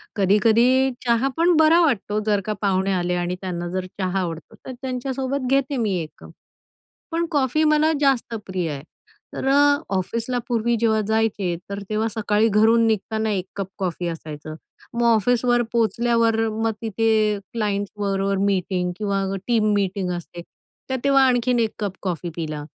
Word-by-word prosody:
कधी-कधी 230 Hz, +6 st, +3 dB
चहा 235 Hz, +2 st, +2 dB
पण 340 Hz, +1 st, +4 dB
बरा 320 Hz, +2 st, +6 dB
वाटतो, 215 Hz, -, +1 dB
जर 205 Hz, -2 st, +2 dB
का 215 Hz, -, -1 dB
पाहुणे 195 Hz, -1 st, +1 dB
आले 180 Hz, -1 st, 0 dB
आणि 175 Hz, 0 st, -2 dB
त्यांना 175 Hz, -2 st, -4 dB
जर 185 Hz, +1 st, -3 dB
चहा 190 Hz, 0 st, 0 dB
आवडतो 165 Hz, -3 st, -5 dB
तर -, -, -6 dB
त्यांच्यासोबत 260 Hz, +1 st, -3 dB
घेते 275 Hz, 0 st, +1 dB
मी 215 Hz, -5 st, 0 dB
1 155 Hz, -, -6 dB
कप. -, -, -13 dB, 0.8 s
पण 335 Hz, +1 st, 0 dB
कॉफी 290 Hz, +1 st, +1 dB
मला 305 Hz, +1 st, +3 dB
जास्त 265 Hz, -4 st, +1 dB
प्रिय 185 Hz, -3 st, -2 dB
आहे. 140 Hz, -1 st, -6 dB, 0.5 s
तर -, -, -3 dB
अ, 285 Hz, +1 st, +5 dB, 0.2 s
ऑफिसला 230 Hz, +6 st, -2 dB
पूर्वी 235 Hz, -1 st, +1 dB
जेव्हा 220 Hz, -1 st, +2 dB
जायचे 215 Hz, -5 st, 0 dB
तर 200 Hz, 0 st, -4 dB
तेव्हा 215 Hz, +1 st, 0 dB
सकाळी 210 Hz, 0 st, +2 dB
घरून 225 Hz, +2 st, +4 dB
निघताना 220 Hz, 0 st, -1 dB
1 190 Hz, -3 st, -2 dB
कप 195 Hz, -2 st, -3 dB
कॉफी 180 Hz, -2 st, -3 dB
असायचा. 155 Hz, -2 st, -7 dB, 0.4 s
मग 235 Hz, 0 st, 0 dB
ऑफिसवर 240 Hz, +2 st, +2 dB
पोहोचल्यावर 230 Hz, 0 st, +2 dB, 0.2 s
मग 225 Hz, -, +2 dB
तिथे 220 Hz, -1 st, +1 dB
क्लायंट्सबरोबर 200 Hz, -2 st, -1 dB
मीटिंग 185 Hz, -2 st, 0 dB
किंवा 200 Hz, -2 st, -1 dB, 0.2 s
टीम 220 Hz, -3 st, +2 dB
मीटिंग 195 Hz, -2 st, -1 dB
असते, 175 Hz, 0 st, -9 dB, 0.5 s
तर 260 Hz, -, 0 dB
तेव्हा 275 Hz, -1 st, +5 dB
आणखीन 245 Hz, -1 st, +2 dB
1 225 Hz, -2 st, 0 dB
कप 195 Hz, -2 st, -3 dB
कॉफी 175 Hz, -2 st, -3 dB
पिला. 155 Hz, -3 st, -4 dB
215 Hz, 155 wpm, -22 LUFS, 190-245 Hz, 0.8 s, बरा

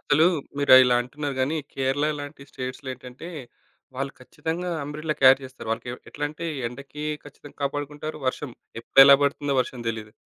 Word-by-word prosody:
అసలు 155 Hz, +3 st, +4 dB, 0.3 s
మీరు 140 Hz, -2 st, +4 dB
ఇలా 125 Hz, -1 st, +4 dB
అంటున్నారు 140 Hz, +2 st, -5 dB
గానీ, 140 Hz, +5 st, +1 dB, 0.2 s
కేరళ 135 Hz, +2 st, 0 dB, 0.2 s
లాంటి 145 Hz, 0 st, -9 dB
స్టేట్స్‌లో 130 Hz, +1 st, -6 dB
ఏంటంటే, 125 Hz, +6 st, -10 dB, 0.7 s
వాళ్లు 135 Hz, +1 st, -3 dB
ఖచ్చితంగా 160 Hz, +7 st, -4 dB
అంబ్రెలా 155 Hz, +2 st, -3 dB
క్యారీ 130 Hz, 0 st, +8 dB
చేస్తారు. 130 Hz, -3 st, -9 dB
వాళ్లకెవ్ 120 Hz, +2 st, -3 dB
ఎట్లా 145 Hz, -, -4 dB
అంటే 160 Hz, +3 st, -6 dB, 0.2 s
ఎండకి 135 Hz, +4 st, -8 dB, 0.2 s
ఖచ్చితంగా 145 Hz, 0 st, -14 dB
కాపాడుకుంటారు. 145 Hz, +2 st, -3 dB
వర్షం, 130 Hz, +2 st, -2 dB, 0.3 s
ఎప్పుడెలా 135 Hz, +4 st, +8 dB
పడుతుందో 140 Hz, 0 st, 0 dB
వర్షం 125 Hz, -1 st, -4 dB
తెలీదు. 110 Hz, -1 st, -5 dB
140 Hz, 145 wpm, -25 LUFS, 130-150 Hz, 0.7 s, క్యారీ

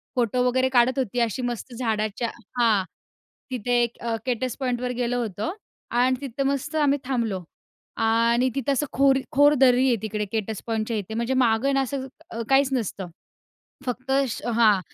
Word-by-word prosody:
Photo 250 Hz, 0 st, +1 dB
वगैरे 260 Hz, +1 st, +2 dB
काढत 255 Hz, +1 st, +3 dB
होती, 245 Hz, -1 st, -1 dB
अशी 235 Hz, +1 st, 0 dB
मस्त 245 Hz, 0 st, -4 dB
झाडाच्या 225 Hz, -1 st, -1 dB, 0.3 s
हां. 220 Hz, -5 st, +4 dB, 0.7 s
तिथे 245 Hz, 0 st, +1 dB
एक 235 Hz, 0 st, -3 dB
अ, 235 Hz, -1 st, -1 dB
केटस 255 Hz, -1 st, -1 dB
पॉईंटवर 250 Hz, -1 st, -1 dB
गेलं 245 Hz, 0 st, -1 dB
होतो 220 Hz, -, -2 dB, 0.4 s
आणि 250 Hz, +2 st, +3 dB
तिथं 275 Hz, 0 st, -3 dB
मस्त 280 Hz, +3 st, -2 dB
आम्ही 290 Hz, -2 st, +3 dB
थांबलो. 230 Hz, -8 st, -1 dB, 0.5 s
आणि 230 Hz, +2 st, +3 dB
तिथे 275 Hz, 0 st, 0 dB
असं 275 Hz, +2 st, +1 dB
खोल 270 Hz, 0 st, +4 dB
खोल 290 Hz, +1 st, +5 dB
दरी 260 Hz, 0 st, +5 dB
आहे 245 Hz, -, +4 dB
तिकडे, 210 Hz, -1 st, -2 dB
केटस 220 Hz, -1 st, -3 dB
पॉईंटच्या 225 Hz, 0 st, -1 dB
इथे 210 Hz, +1 st, -5 dB
म्हणजे 235 Hz, +3 st, -1 dB
मागे 245 Hz, +2 st, +3 dB
ना, 275 Hz, -, +3 dB
असं 265 Hz, 0 st, -3 dB, 0.2 s
अ, 230 Hz, -, -4 dB
काहीच 270 Hz, 0 st, +4 dB
नसतं. 205 Hz, -6 st, -2 dB, 0.8 s
फक्त 255 Hz, +1 st, -4 dB, 0.4 s
हां. 225 Hz, -4 st, +4 dB
245 Hz, 160 wpm, -24 LUFS, 225-260 Hz, 0.8 s, खोल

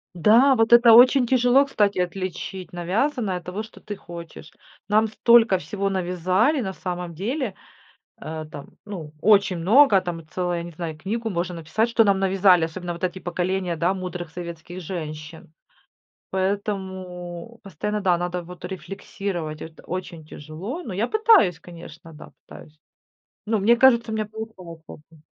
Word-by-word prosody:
Да, 230 Hz, -, +5 dB
вот 225 Hz, 0 st, +3 dB
это 235 Hz, -1 st, +8 dB
очень 250 Hz, +2 st, +7 dB
тяжело, 255 Hz, +2 st, +4 dB
кстати, 205 Hz, -8 st, 0 dB
отличить 185 Hz, +1 st, -4 dB
навязанное 195 Hz, -, -1 dB
от 180 Hz, -, -10 dB
того, 195 Hz, +4 st, -4 dB
что 220 Hz, -, -15 dB
ты 205 Hz, -, -6 dB
хочешь. 170 Hz, -4 st, -11 dB, 0.4 s
Нам 215 Hz, +2 st, +3 dB
столько 225 Hz, -1 st, +4 dB
всего 195 Hz, +5 st, -3 dB
навязали 185 Hz, -, +1 dB
на 190 Hz, -3 st, -4 dB
самом 180 Hz, -2 st, -5 dB
деле. 230 Hz, -, -3 dB, 0.7 s
Э, 155 Hz, 0 st, -6 dB
там, 145 Hz, -, -11 dB
ну, 175 Hz, -8 st, -8 dB
очень 200 Hz, -2 st, +4 dB
много, 210 Hz, +6 st, +5 dB
там 165 Hz, -3 st, -6 dB
целая, 175 Hz, +1 st, -2 dB
не 170 Hz, 0 st, -9 dB
знаю, 160 Hz, -1 st, -6 dB
книгу 225 Hz, +7 st, -3 dB
можно 175 Hz, -1 st, -3 dB
написать, 165 Hz, +8 st, -1 dB
что 230 Hz, -1 st, +3 dB
нам 200 Hz, -2 st, +3 dB
навязали, 190 Hz, -2 st, +4 dB
особенно 175 Hz, +2 st, -5 dB
вот 170 Hz, -, -10 dB
эти 185 Hz, +1 st, -2 dB
поколения, 180 Hz, 0 st, -2 dB
да, 175 Hz, +4 st, +1 dB
мудрых 180 Hz, -2 st, -6 dB
советских 170 Hz, +1 st, -8 dB
женщин. 155 Hz, -2 st, -8 dB, 0.8 s
Поэтому 190 Hz, 0 st, -4 dB
постоянно, 210 Hz, +3 st, -4 dB
да, 180 Hz, -3 st, +2 dB
надо 175 Hz, 0 st, -3 dB
вот 180 Hz, +1 st, -10 dB
рефлексировать, 185 Hz, -3 st, -6 dB
это 160 Hz, 0 st, -10 dB
очень 175 Hz, -3 st, -6 dB
тяжело. 165 Hz, -, -7 dB
Но 220 Hz, -, -6 dB
я 210 Hz, +6 st, -1 dB
пытаюсь, 430 Hz, -, +4 dB
конечно, 165 Hz, -1 st, -12 dB
да, 150 Hz, -, -13 dB, 0.2 s
пытаюсь. 155 Hz, 0 st, -14 dB, 0.7 s
Но 220 Hz, 0 st, +1 dB
мне 230 Hz, +4 st, +4 dB
кажется, 235 Hz, -3 st, +4 dB
у -, -, -2 dB
меня 215 Hz, -1 st, -2 dB
получается, 200 Hz, -7 st, -10 dB, 0.3 s
м. 155 Hz, -, -19 dB
185 Hz, 155 wpm, -23 LUFS, 170-215 Hz, 0.8 s, это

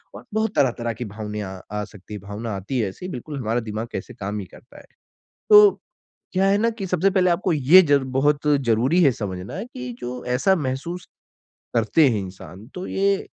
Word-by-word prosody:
और -, -, -10 dB
बहुत 220 Hz, -1 st, 0 dB
तरह-तरह 120 Hz, -3 st, +1 dB
की 120 Hz, +1 st, -6 dB
भावनाएँ 105 Hz, 0 st, -5 dB
अ, 95 Hz, -1 st, -7 dB
आ 105 Hz, 0 st, -2 dB
सकती 105 Hz, 0 st, -12 dB
हैं, 105 Hz, -, -6 dB
भावना 105 Hz, +3 st, -6 dB
आती 100 Hz, +7 st, -3 dB
है 105 Hz, -, +1 dB
ऐसी 180 Hz, -, -8 dB
बिल्कुल 140 Hz, +1 st, -6 dB
हमारा 115 Hz, 0 st, 0 dB
दिमाग 110 Hz, 0 st, -5 dB
कैसे 125 Hz, -, -6 dB
काम 105 Hz, -2 st, -4 dB
ही 95 Hz, -, -6 dB
करता -, -, -17 dB
है। -, -, -16 dB, 0.7 s
तो, 420 Hz, -1 st, +8 dB, 0.5 s
क्या 190 Hz, +1 st, +2 dB
है 200 Hz, +1 st, +3 dB
ना 230 Hz, +2 st, +2 dB
कि 210 Hz, -4 st, -6 dB
सबसे 180 Hz, +2 st, +2 dB
पहले 185 Hz, -2 st, +3 dB
आपको 175 Hz, +1 st, +1 dB
ये 155 Hz, +5 st, +7 dB
जर 140 Hz, -2 st, +4 dB
बहुत 145 Hz, +1 st, +2 dB
ज़रूरी 135 Hz, +3 st, +3 dB
है 135 Hz, -, +5 dB
समझना 100 Hz, -, -5 dB
कि 125 Hz, -, -7 dB
जो 125 Hz, 0 st, -6 dB
ऐसा 190 Hz, +9 st, +3 dB
महसूस 160 Hz, +5 st, -4 dB, 0.7 s
करते 125 Hz, +6 st, +4 dB
हैं 110 Hz, -4 st, 0 dB
इंसान 95 Hz, +1 st, -10 dB
तो 180 Hz, +1 st, -5 dB
ये, 195 Hz, 0 st, 0 dB
125 Hz, 195 wpm, -23 LUFS, -, 0.7 s, तो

